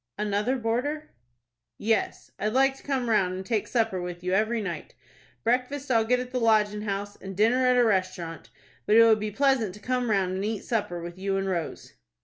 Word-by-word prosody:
"Another 210 +5 0
boarder?" 260 +7 -2 0.7
"Yes, 220 +1 -1
I'd 215 +1 -1
like 270 +1 +3
to - - -15
come 265 -3 -2
round, 190 -5 +2
and 190 +1 -6
take 215 -1 -1
supper 225 -6 0
with 175 0 -6
you 180 0 -1
every 220 +4 +1
night. 175 -7 -5 0.5
Breakfast 255 +4 0
I'll 225 -2 +3
get 250 +2 +2
at 250 0 -6
the 255 - -1
Lodgin' 210 -2 +2
House, 205 0 -3
and 190 -1 -8
dinner 245 +5 +3
at 250 0 +4
a 245 - +5
restaurant, 185 -6 -1 0.4
but 215 - +4
it 230 - +9
would 220 -1 +5
be 215 0 -2
pleasant 235 -4 +1
to - - -12
come 250 +2 -1
round, 190 -3 +1
and 190 +1 -2
eat 215 -1 -2
supper 190 -7 -2
with 175 +1 -8
you 195 0 -1
and 195 0 -1
Rose." 170 -4 -4
215 Hz, 205 wpm, -26 LUFS, 195-245 Hz, 0.7 s, it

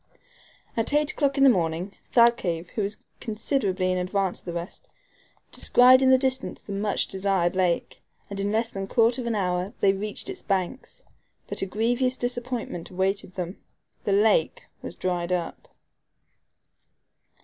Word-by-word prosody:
At 225 +5 -1
eight 300 0 +3
o'clock 280 -2 0
in 275 - +4
the 270 - +8
evening, 170 +2 -2 0.2
Thalcave, 200 -9 +3
who 215 - -2
was 205 +1 -3 0.2
considerably 210 -5 -1
in 185 - 0
advance 190 0 -1
of - - -22
the 175 - -5
rest, 170 +2 -7 0.6
descried 255 +1 +6
in 260 - +4
the 260 - +7
distance 260 0 -1
the - - -11
much 205 +1 0
desired 190 -2 0
lake, 180 -2 0 0.3
and 200 -1 -6
in 200 +1 -1
less 225 +1 0
than 195 0 -4
a - - -13
quarter 235 +4 +3
of 235 - -5
an 230 - 0
hour 180 0 -1
they 195 - +4
reached 205 +2 -4
its 385 -1 -5
banks; 195 +5 -3 0.4
but - - -4
a 195 - -1
grievous 245 +6 0
disappointment 245 -7 -3
awaited 190 0 -2
them 180 +1 -5 0.4
the 205 - -1
lake 200 -5 +3 0.2
was - - -7
dried 180 -1 -2
up. 175 -2 -3
200 Hz, 160 wpm, -25 LUFS, 185-240 Hz, 0.6 s, the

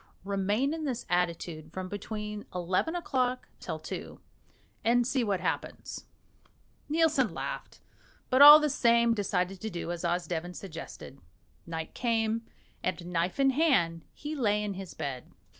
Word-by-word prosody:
Remain 200 +8 0
in 320 -1 -4
this 255 -4 -3
attitude 170 -3 -1
from 185 +1 -5
between 210 +1 -5
eleven 185 - 0
o'clock 255 -7 -1
till - - -4
two, - - -7 0.6
and 240 +1 +3
see 260 0 +1
what 200 -5 0
happens." 180 - -4 0.8
Nielsen 310 -6 +2
laughed, - - -6 0.5
but 260 +2 +5
all 295 +1 +13
the 300 - +1
same 235 -4 +4
decided 195 -3 -1
to 220 - -3
do 175 -2 -4
as 175 -1 -5
Osdeven 175 0 -2
suggested. 165 -6 -9 0.5
Night 160 -1 -5
came, 225 -2 0 0.4
and, 180 -1 -2
knife 175 +7 0
in 270 0 +5
hand, 250 - +2
he 300 +1 -6
lay 210 -6 +1
in 205 -1 -2
his 190 -1 -8
bed. 130 -3 -5
205 Hz, 140 wpm, -29 LUFS, 175-255 Hz, 0.8 s, all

